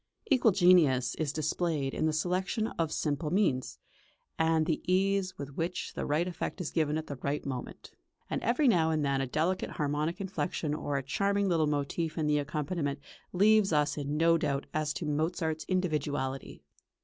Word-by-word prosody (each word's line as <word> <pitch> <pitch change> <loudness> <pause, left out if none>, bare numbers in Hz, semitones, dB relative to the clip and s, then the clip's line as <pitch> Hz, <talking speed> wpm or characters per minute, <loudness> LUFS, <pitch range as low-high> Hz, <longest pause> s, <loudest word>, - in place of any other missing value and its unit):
Equal 250 -4 +5
genius 170 -10 +4
is 155 -3 -2
displayed 155 -2 -1
in 155 - 0
the - - +2
selection 185 +7 -1
of 165 -2 0
simple 150 +1 -1
meins, 160 -8 0 0.6
and 160 -1 +3
the 160 -1 -1
ease 190 0 +1
with 140 -1 -7
which 170 +2 -3
the - - -4
right 155 +4 +1
effect 175 +1 -4
is 180 - -3
given 155 -2 +1
at 160 - -4
the 140 - -6
right 140 +3 -3
moment; 130 -3 -6 0.4
and - - -3
every 250 +5 +2
now 170 -8 +4
and 155 -2 0
then 135 -1 +1
a 135 - -1
delicate 170 +8 0
harmonic 150 +4 -2
inflection, 180 -5 -2
or 145 -2 -2
a 140 - -2
charming 200 +8 +1
little 165 -4 +2
motif 150 +3 -2
in 160 - 0
the 150 0 +2
accompaniment, 145 0 -2 0.3
leaves 210 +1 +4
us 150 -1 +2
in 145 0 -3
no 165 +1 +4
doubt 140 -2 -1
as 155 -1 0
to 170 - -4
Mozart's 160 +1 -1
individuality. 150 -7 -2
155 Hz, 175 wpm, -30 LUFS, 145-180 Hz, 0.6 s, Equal